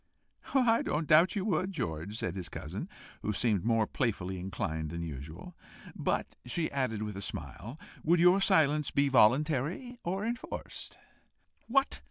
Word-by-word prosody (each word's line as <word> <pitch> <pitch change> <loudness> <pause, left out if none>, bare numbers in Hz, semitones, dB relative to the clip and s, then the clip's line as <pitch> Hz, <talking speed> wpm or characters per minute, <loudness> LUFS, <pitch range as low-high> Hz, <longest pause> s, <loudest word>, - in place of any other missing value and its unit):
"I 240 -4 +4
don't 155 +2 -1
doubt 165 +5 +6
you 200 -2 -1
would, 185 -1 0
George," 80 - -3
said 90 -5 -2
his 90 -3 -5
cousin, - - -6 0.3
who 105 - -1
seemed 105 -3 +1
more 115 -1 +3
playfully 95 -7 -2
inclined 80 -4 -3
than 85 +2 -4
usual. 80 - -8 0.4
"But," - - -1
she 155 +7 -1
added, 125 -6 -1
with 105 -2 -5
a 100 - -5
smile, 115 +6 -6 0.2
"would 170 +2 +4
your 180 +3 +6
silence 155 -6 +3
be 140 0 +2
voluntary, 150 - +2
or 190 +4 -2
enforced?" 235 +2 -5 0.7
"What!" 275 +3 +2
135 Hz, 150 wpm, -31 LUFS, -, 0.7 s, doubt